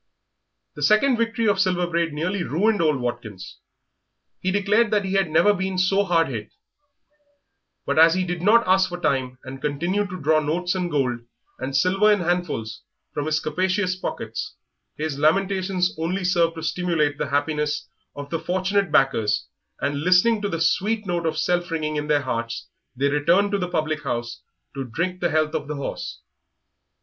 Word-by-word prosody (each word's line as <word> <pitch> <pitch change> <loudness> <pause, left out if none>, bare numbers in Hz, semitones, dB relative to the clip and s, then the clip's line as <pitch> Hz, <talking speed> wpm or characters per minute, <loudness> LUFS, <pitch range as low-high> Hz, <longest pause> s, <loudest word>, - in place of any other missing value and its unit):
The 150 - -10
second 215 - +4
victory 230 0 0
of 200 -2 +2
Silver 180 -1 +2
Braid 170 -1 0
nearly 180 +6 -2
ruined 200 +5 +1
old 155 -4 +2
Watkins. 115 -6 -6 0.8
He 185 - -1
declared 205 +3 +2
that 205 -2 +1
he 190 - -3
had 195 -3 +2
never 185 +7 +4
been 190 -1 -3
so 195 +2 +3
hard 170 -4 +2
hit; 110 -5 -6 1.3
but - - +1
as 165 +1 +7
he 185 - +1
did 175 -1 -3
not 225 +5 +5
ask 185 0 +4
for 175 0 -6
time 130 -5 -1
and 135 +1 -9
continued 175 +8 -1
to 185 0 -6
draw 155 +1 +3
notes 170 +4 -1
and 180 -2 -2
gold 130 -6 0 0.4
and 130 +2 -4
silver 195 +7 +4
in 205 -2 +2
handfuls 170 -11 -2 0.3
from 145 +1 -3
his 155 0 +1
capacious 185 +3 0
pockets, 420 - -5 0.4
his 150 -2 -3
lamentations 185 +3 +1
only 180 +4 -1
served 170 -2 +2
to 160 - -7
stimulate 160 -4 0
the - - -2
happiness 150 +1 -1 0.3
of 145 0 -8
the 165 - -1
fortunate 190 +1 0
backers, 115 -7 +2 0.4
and, 140 0 -1
listening 185 +6 +4
to 205 - -1
the 165 - -3
sweet 210 +6 +1
note 175 -3 -1
of 160 -1 -2
self 175 +1 0
ringing 155 -2 -2
in 150 0 -3
their 145 -1 +2
hearts, 115 -3 -3 0.3
they 135 +3 +1
returned 170 +8 +2
to 200 - 0
the 180 -1 -2
public 155 -2 -1
house 120 0 -4 0.3
to 135 -1 -4
drink 170 +9 -3
the 175 - +1
health 155 -1 +1
of 155 -3 -3
the 150 - -4
horse. 140 - -5
170 Hz, 180 wpm, -23 LUFS, 145-185 Hz, 1.3 s, as